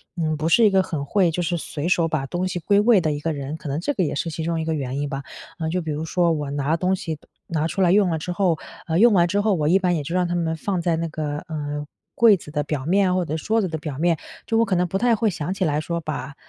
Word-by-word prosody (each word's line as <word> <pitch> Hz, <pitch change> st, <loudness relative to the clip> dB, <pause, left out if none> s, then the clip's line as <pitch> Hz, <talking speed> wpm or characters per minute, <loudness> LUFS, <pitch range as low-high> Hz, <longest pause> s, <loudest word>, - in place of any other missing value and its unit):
嗯， 160 Hz, -3 st, 0 dB
不 155 Hz, -, -1 dB
是 230 Hz, +6 st, +5 dB
一 -, -, +6 dB
个 195 Hz, -1 st, +4 dB
很 155 Hz, -6 st, -4 dB
会 185 Hz, +1 st, +2 dB
就 175 Hz, -, -2 dB
是 175 Hz, 0 st, -1 dB
随 155 Hz, 0 st, -4 dB
手 170 Hz, -2 st, +3 dB
把 155 Hz, -4 st, -1 dB
东 175 Hz, +5 st, -2 dB
西 180 Hz, -1 st, -3 dB
归 200 Hz, +5 st, +3 dB
位 215 Hz, -1 st, +5 dB
的 155 Hz, -2 st, 0 dB
一 145 Hz, -, -3 dB
个 160 Hz, +2 st, -2 dB
人。 140 Hz, +1 st, -5 dB
可 155 Hz, -, -9 dB
能 140 Hz, +3 st, -1 dB
这 235 Hz, -, -1 dB
个 190 Hz, -, 0 dB
也 150 Hz, -, -1 dB
是 165 Hz, -, -2 dB
其 160 Hz, 0 st, -4 dB
中 165 Hz, 0 st, -1 dB
一 -, -, -3 dB
个 160 Hz, -, 0 dB
原 135 Hz, -2 st, -3 dB
因 145 Hz, -, -2 dB
吧， 140 Hz, -1 st, -4 dB, 0.4 s
呃， 160 Hz, -1 st, -1 dB
就 180 Hz, +2 st, -1 dB
比 160 Hz, -2 st, -4 dB
如 150 Hz, +2 st, -3 dB
说 170 Hz, +1 st, +2 dB
我 150 Hz, -3 st, -2 dB
拿 145 Hz, +2 st, 0 dB
东 185 Hz, +2 st, +1 dB
西， 160 Hz, -4 st, -5 dB, 0.3 s
拿 160 Hz, -1 st, 0 dB
出 190 Hz, -, -2 dB
来 180 Hz, -2 st, +4 dB
用 200 Hz, -1 st, +4 dB
了 165 Hz, -, 0 dB
之 160 Hz, +3 st, -4 dB
后， 175 Hz, -2 st, +1 dB, 0.3 s
呃， 160 Hz, -, +1 dB
用 235 Hz, 0 st, +6 dB
完 175 Hz, -3 st, +4 dB
之 200 Hz, +4 st, +1 dB
后， 210 Hz, 0 st, +2 dB
我 150 Hz, -3 st, 0 dB
一 175 Hz, +5 st, +5 dB
般 180 Hz, -2 st, +1 dB
也 155 Hz, -, -2 dB
就 165 Hz, +5 st, -4 dB
让 180 Hz, -1 st, +2 dB
它 175 Hz, -, -2 dB
们 165 Hz, -2 st, 0 dB
放 185 Hz, +1 st, -2 dB
在 170 Hz, -1 st, +1 dB
那 165 Hz, +1 st, -2 dB
个， 150 Hz, -1 st, -3 dB
呃， 150 Hz, -2 st, -4 dB, 0.3 s
柜 230 Hz, -3 st, +6 dB
子 150 Hz, -, -12 dB
的 150 Hz, -1 st, -1 dB
表 145 Hz, -2 st, -3 dB
面 185 Hz, +2 st, +3 dB
或 185 Hz, -1 st, 0 dB
者 155 Hz, -, -3 dB
桌 220 Hz, +6 st, +1 dB
子 190 Hz, -, 0 dB
的 160 Hz, -2 st, -3 dB
表 150 Hz, -3 st, -6 dB
面。 170 Hz, -1 st, +2 dB, 0.3 s
就 225 Hz, -, +1 dB
我 230 Hz, -, +4 dB
可 200 Hz, -5 st, 0 dB
能 180 Hz, 0 st, +1 dB
不 190 Hz, -, -1 dB
太 235 Hz, +2 st, +3 dB
会 220 Hz, 0 st, +1 dB
想 175 Hz, -1 st, -3 dB
起 190 Hz, -1 st, -1 dB, 0.2 s
说 170 Hz, +2 st, -3 dB
把 150 Hz, -3 st, -5 dB
165 Hz, 330 characters per minute, -23 LUFS, 155-185 Hz, 0.4 s, 一